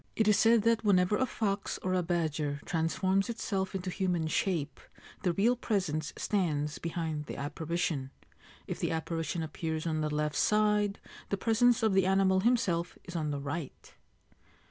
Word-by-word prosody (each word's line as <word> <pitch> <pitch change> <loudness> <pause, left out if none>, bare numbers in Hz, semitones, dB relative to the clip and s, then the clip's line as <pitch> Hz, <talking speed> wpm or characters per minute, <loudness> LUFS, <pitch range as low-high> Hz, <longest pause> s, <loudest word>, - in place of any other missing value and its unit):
(It 220 - +2
is 210 - +6
said 225 -1 +5
that 230 0 +2
whenever 190 -1 +3
a 260 +4 +1
fox 200 -4 -2
or 185 - 0
a 185 - +2
badger 160 -4 -1
transforms 185 +5 0
itself 195 -4 -2
into 185 -1 -3
human 180 -4 0
shape 155 -2 -1 0.4
the 180 - +1
real 220 +8 +3
presence 180 -10 -1
stands 150 -7 -1
beside 160 -3 -3
the - - -6
apparition. 155 -1 -2 0.6
If - - -5
the - - 0
apparition 165 0 -2
appears 160 0 -3
on 155 -1 0
the 155 - 0
left 150 0 -1
side, 210 -1 +2 0.3
the 200 - 0
presence 230 +3 +3
of 220 -3 +3
the 190 -1 +3
animal 190 0 +3
himself 190 -6 +1
is 175 - -9
on 155 -2 -1
the 145 -1 -2
right.) 145 +1 -6
180 Hz, 165 wpm, -31 LUFS, 160-205 Hz, 0.6 s, is